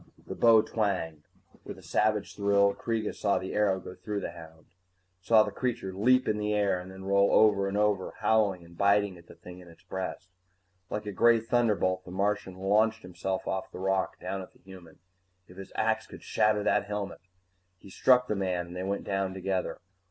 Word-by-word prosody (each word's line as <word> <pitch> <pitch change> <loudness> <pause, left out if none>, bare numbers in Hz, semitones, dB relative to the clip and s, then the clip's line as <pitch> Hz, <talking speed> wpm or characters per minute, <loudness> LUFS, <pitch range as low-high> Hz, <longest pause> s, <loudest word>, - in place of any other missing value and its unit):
The - - -6
bow 115 -2 +5
twanged. 90 -8 -2 0.4
With - - -8
a - - -15
savage 105 -1 0
thrill, 100 0 +3
Kreega 115 -1 -3
saw 100 -1 0
the 95 - -5
arrow 100 -3 +2
go 90 - -9
through 105 +1 -5
the - - -4
hound, 80 -1 -13 0.6
saw 110 +3 +5
the 105 - -5
creature 120 -3 -3
leap 130 +7 +3
in 105 0 0
the 105 0 0
air 100 -3 +1
and 90 +1 -9
then 95 0 -10
roll 100 0 +3
over 100 -2 +4
and 100 +1 -2
over, 105 -3 0
howling 100 -6 +2
and 85 0 -16
biting 100 0 +2
at 85 - -19
the - - -14
thing 90 0 -12
in 90 - -14
its 85 -1 -17
breast. 95 -1 -6 0.6
Like 105 +1 -4
a 105 - -4
gray 115 +4 +4
thunderbolt, 110 -5 +1
the - - -12
Martian 100 0 -1
launched 105 +4 +1
himself 90 +1 -4
off 95 0 -3
the - - -9
rock, 95 0 -1
down 95 +1 -4
at 95 - -12
the - - -25
human. 90 -4 -13 0.5
If 90 - -16
his 95 - -9
axe - - 0
could - - -12
shatter 105 -1 +1
that - - +2
helmet 105 -2 -5 0.6
He 95 - -15
struck 125 +4 +4
the 105 - -1
man 90 -3 -1
and 85 +1 -11
they 90 - -4
went 100 +1 -2
down 95 -1 -2
together. 95 0 -3
100 Hz, 205 wpm, -29 LUFS, 95-105 Hz, 0.6 s, bow